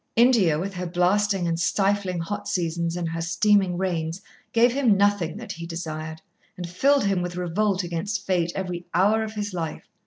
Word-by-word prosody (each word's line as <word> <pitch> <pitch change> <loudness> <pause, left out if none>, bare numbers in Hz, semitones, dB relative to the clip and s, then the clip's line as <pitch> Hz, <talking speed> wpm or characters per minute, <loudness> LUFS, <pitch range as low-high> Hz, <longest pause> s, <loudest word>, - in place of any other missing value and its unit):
India 225 -10 +4
with 195 +5 -3
her 180 -1 -4
blasting 185 +2 +1
and 165 0 -1
stifling 195 0 +1
hot 205 +4 -4
seasons 170 -3 -1
and 175 -1 -2
her 165 +1 -3
steaming 190 +1 +2
rains 170 -2 -2 0.3
gave 235 +1 +4
him 250 -7 +3
nothing 200 -3 +1
that 230 +1 -7
he 170 0 -6
desired, 160 -1 -6 0.3
and 175 -1 -5
filled 275 +11 +2
him 195 -2 +1
with 175 0 -4
revolt 185 +2 0
against 175 +5 -3
Fate 175 -3 +1
every 180 -2 -4
hour 205 +5 +4
of 220 -1 -4
his 205 -1 -3
life. 165 -3 -4
180 Hz, 180 wpm, -24 LUFS, 170-205 Hz, 0.3 s, India